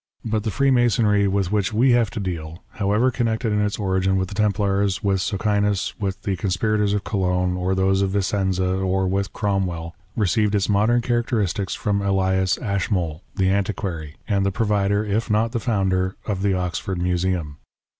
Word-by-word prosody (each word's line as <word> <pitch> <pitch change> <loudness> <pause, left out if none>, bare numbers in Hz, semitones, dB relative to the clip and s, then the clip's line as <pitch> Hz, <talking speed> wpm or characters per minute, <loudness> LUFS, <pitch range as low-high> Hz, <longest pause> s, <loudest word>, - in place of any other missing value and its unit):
But 110 -1 0
the 110 - -1
Freemasonry 120 -5 +3
with 95 -1 0
which 105 -1 0
we 125 +4 +4
have 120 -3 +3
to 105 - -5
deal, 85 -4 -5
however 105 +5 +1
connected 115 -2 -1
in 105 - +2
its 105 0 -1
origin 95 -1 +1
with 95 -1 -1
the - - -7
Templars, 100 -1 +1
with 95 -2 +1
Socinus, 100 0 0
with 95 -2 -3
the 95 - -1
conspirators 105 +2 0
of 100 - -2
Cologne, 90 -3 0
or 90 +1 0
those 95 +1 +2
of 100 - +1
Vicenza, 95 -1 0
or 95 0 0
with 95 +1 -1
Cromwell, 90 -5 -2 0.2
received 105 0 +1
its 100 -1 +1
modern 110 +4 +3
characteristics 115 -5 -1
from 100 -1 -1
Ellas 95 -1 +1
Ashmole, 95 -6 -2
the 95 0 +2
Antiquary, 95 -6 -2
and 100 -2 +1
the 100 - +1
provider, 100 0 +1
if 110 +3 -1
not 110 +2 +2
the 120 - -1
founder, 95 -4 0
of 100 -3 -2
the 100 -1 +2
Oxford 90 +1 -3
Museum. 90 -4 -1
100 Hz, 170 wpm, -22 LUFS, 95-105 Hz, 0.2 s, we